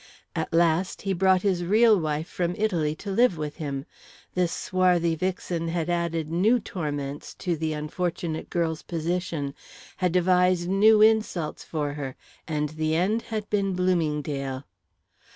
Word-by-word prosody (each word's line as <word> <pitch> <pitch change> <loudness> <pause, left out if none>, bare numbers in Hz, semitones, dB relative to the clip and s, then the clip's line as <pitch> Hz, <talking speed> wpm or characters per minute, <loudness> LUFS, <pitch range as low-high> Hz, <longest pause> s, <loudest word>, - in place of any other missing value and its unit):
At - - -2
last, 170 +2 +2
he 195 -1 0
brought 185 0 +3
his 185 -4 +1
real 215 +5 +5
wife 155 0 -2
from 175 0 -2
Italy 170 -8 0
to 200 +5 -6
live 230 -3 +3
with 150 -1 -5
him. 140 -4 -4 0.5
This 180 -2 +1
swarthy 180 -2 +2
vixen 175 0 -2
had 170 0 -1
added 165 -2 -1
new 210 +9 +3
torments 145 -8 -5
to 175 -3 -2
the 160 0 -2
unfortunate 160 +1 -3
girl's 165 -2 -1
position, 165 -4 -2 0.4
had 180 -2 +1
devised 180 0 +3
new 210 +3 +5
insults 215 -8 +1
for 150 -3 -3
her, 135 -3 -5 0.3
and 150 -2 -1
the 155 +1 -1
end 200 +7 +1
had 215 -2 -3
been 195 -2 +1
Bloomingdale. 150 -7 -1
170 Hz, 145 wpm, -26 LUFS, 155-185 Hz, 0.5 s, real